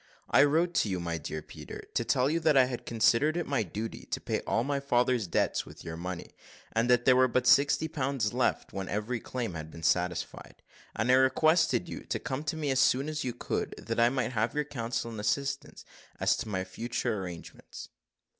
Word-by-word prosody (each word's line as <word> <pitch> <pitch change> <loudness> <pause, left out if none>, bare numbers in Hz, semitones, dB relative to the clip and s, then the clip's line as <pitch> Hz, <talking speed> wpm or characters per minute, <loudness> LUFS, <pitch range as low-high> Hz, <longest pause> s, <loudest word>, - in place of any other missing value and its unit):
"I - - +7
wrote 165 +4 +2
to 110 - +1
you, 95 -2 -1
my 85 -1 -3
dear 80 +1 -5
Peter, - - -9
to - - +1
tell 125 +1 +2
you 160 +3 +1
that 155 -3 +3
I 130 - +7
had 125 -1 -6
considered 120 +7 +3
it 175 - -1
my 140 -4 0
duty 110 +3 -5
to - - -2
pay - - -2
all 115 - +1
my 140 +1 -1
father's 125 -5 +1
debts 85 - +1
with - - -13
your 80 -1 -5
money, 90 +1 -6 0.4
and 115 +2 +1
that 125 0 +4
there 130 - +6
were 130 0 +5
but 125 +1 0
sixty 145 +3 +4
pounds 135 -7 -1
left 125 0 0
when 95 -1 -4
every 110 +4 -2
claim 120 -4 -4
had 80 -1 -6
been 80 0 -11
satisfied; 90 +1 -1 0.3
and 110 +3 +1
I - - +6
requested 155 +7 +3
you - - -6
to - - -2
come 135 +2 -4
to 155 +2 -2
me 150 -3 -1
as 130 - +1
soon 135 +2 +3
as 155 0 -3
you 125 - -1
could, 120 - -3
that 115 0 -3
I 120 +1 +5
might 125 -2 -1
have 115 0 -1
your 150 - +1
counsel 115 -4 -3
and 110 - -7
assistance 140 +7 -2 0.3
as - - +3
to - - -5
my 95 -2 -1
future 110 +2 -3
arrangements." 90 -3 -9
125 Hz, 215 wpm, -29 LUFS, 105-140 Hz, 0.4 s, I